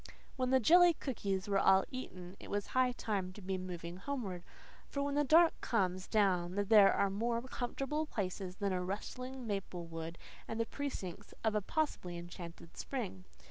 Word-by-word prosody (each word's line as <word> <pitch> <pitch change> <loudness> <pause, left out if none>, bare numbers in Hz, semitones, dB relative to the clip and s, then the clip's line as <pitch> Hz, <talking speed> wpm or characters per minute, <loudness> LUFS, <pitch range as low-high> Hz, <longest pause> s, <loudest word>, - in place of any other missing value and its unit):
When 255 -1 0
the 260 0 +5
jelly 345 +6 +7
cookies 200 -10 -2
were 200 -1 +2
all 190 0 +5
eaten 185 -8 -7
it - - -10
was 205 0 -1
high 255 -1 +2
time 200 -6 -2
to 205 - -11
be 190 +1 -1
moving 175 -1 -6
homeward, 200 -6 -4 0.5
for 280 - -1
when 285 0 -1
the 295 +1 +3
dark 325 +4 +6
comes 185 -4 0
down 185 -4 +2
there 205 0 +6
are 200 - +2
more 230 +4 0
comfortable 270 +4 -2
places 185 -5 -3
than 200 0 -1
a 180 0 -1
rustling 250 +7 -5
maple 195 -4 -3
wood 165 0 -6 0.3
and 225 - -4
the 230 - +2
precincts 225 -10 -5
of 220 -1 +2
a 210 - +1
possibly 200 - -2
enchanted 170 -1 -9
spring. 205 - -4
205 Hz, 175 wpm, -35 LUFS, 185-255 Hz, 0.5 s, jelly